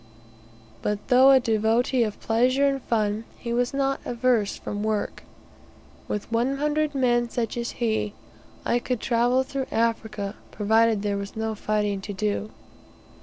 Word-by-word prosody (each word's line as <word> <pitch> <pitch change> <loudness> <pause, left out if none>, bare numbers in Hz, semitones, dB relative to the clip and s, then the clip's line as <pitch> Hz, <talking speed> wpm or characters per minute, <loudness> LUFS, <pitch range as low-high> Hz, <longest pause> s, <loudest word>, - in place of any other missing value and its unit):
But 210 +2 -3
though 260 +1 +7
a 270 -1 +7
devotee 230 +2 +1
of 215 -3 -1
pleasure 255 +5 +2
and 275 -1 +1
fun, 215 -2 0
he 235 -1 -4
was 245 +1 +1
not 275 0 0
averse 235 -4 +1
from 205 - -5
work. 215 -1 -2 0.9
With 210 +2 -4
one 245 +4 +1
hundred 300 0 0
men 240 -2 +2
such 230 -1 -2
as 235 0 -3
he, 220 -3 -1 0.5
I 240 - +2
could 250 -1 -2
travel 245 +3 +2
through 270 0 -4
Africa 220 -3 -1
provided 220 0 +2
there 205 -1 0
was 200 0 -7
no 220 0 -2
fighting 210 -2 -1
to 205 +1 -6
do. 210 +1 -2
230 Hz, 150 wpm, -25 LUFS, 215-255 Hz, 0.9 s, though